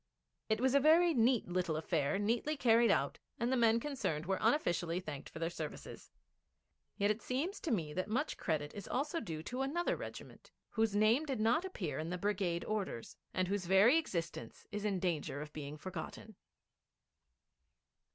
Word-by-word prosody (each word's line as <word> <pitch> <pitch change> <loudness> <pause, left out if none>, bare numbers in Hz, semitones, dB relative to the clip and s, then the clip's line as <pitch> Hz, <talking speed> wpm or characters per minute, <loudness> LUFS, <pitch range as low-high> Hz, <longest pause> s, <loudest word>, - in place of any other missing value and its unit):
It 220 0 +2
was 260 +1 +2
a 280 - +6
very 330 +4 +5
neat 240 -2 +3
little 175 -2 0
affair, 155 +1 0
neatly 235 +9 0
carried 235 -2 +5
out, 140 -8 +1 0.2
and 235 +2 0
the - - +3
men 230 -2 +4
concerned 220 - -2
were 190 +1 0
unofficially 175 - +1
thanked 155 -6 -7
for - - -10
their 165 +1 -2
services. - - -7 0.9
Yet 205 0 +3
it 215 - -3
seems 305 +11 -2
to - - -4
me 165 - 0
that 185 +3 -2
much 255 +8 -1
credit 150 -3 -2
is 205 - -7
also 295 +5 -1
due 160 - -5
to 250 +8 -4
another 315 +6 0
regiment - - -9 0.2
whose 220 -2 +1
name 225 +9 +4
did 265 -5 -2
not 235 - +3
appear 175 - -4
in 160 +1 -3
the 180 - -2
brigade 185 -3 -1
orders, 195 - -3 0.2
and 185 0 0
whose 195 -2 -2
very 205 - +6
existence 170 - -5
is 210 0 -3
in 200 -2 +1
danger 165 -6 -1
of 150 +1 -7
being 150 0 -6
forgotten. 185 +5 -7
205 Hz, 175 wpm, -35 LUFS, 170-250 Hz, 0.9 s, a